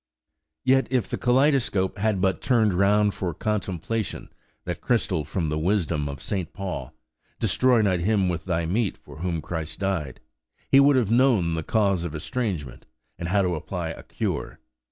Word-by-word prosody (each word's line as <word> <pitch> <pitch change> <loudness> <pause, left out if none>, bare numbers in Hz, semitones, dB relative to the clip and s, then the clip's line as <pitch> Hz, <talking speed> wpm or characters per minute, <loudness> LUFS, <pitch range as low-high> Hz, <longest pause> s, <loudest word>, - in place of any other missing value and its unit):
Yet, 135 +1 +3
if 130 -3 +1
the - - -3
kaleidoscope 125 -7 +2
had 105 -2 +1
but 95 -1 +1
turned 110 -6 +3
round 100 +2 +3
for 90 -4 -3
contemplation 105 0 -3 0.4
that - - -4
crystal 75 - +1
from 80 +2 -2
the 75 +1 -1
wisdom 85 -5 0
of 70 -1 -7
St. 95 -5 -3
Paul, 95 -2 -5 0.4
"Destroy 125 -3 +3
not 95 -3 +2
him 100 +1 +2
with 85 -2 -2
thy 85 -3 0
meat 100 +4 0
for - - -14
whom 85 -3 -2
Christ 80 -1 -4
died," 95 -9 -2 0.5
he 135 - +6
would 140 0 +6
have 115 -5 +2
known 115 -9 +3
the 80 - -1
cause 100 -1 +1
of 85 -3 -4
estrangement, 80 - -3 0.3
and 85 - -3
how 100 +2 +3
to 90 -1 0
apply 85 +1 -4
a 80 - -7
cure. - - -4
95 Hz, 170 wpm, -25 LUFS, 85-110 Hz, 0.5 s, he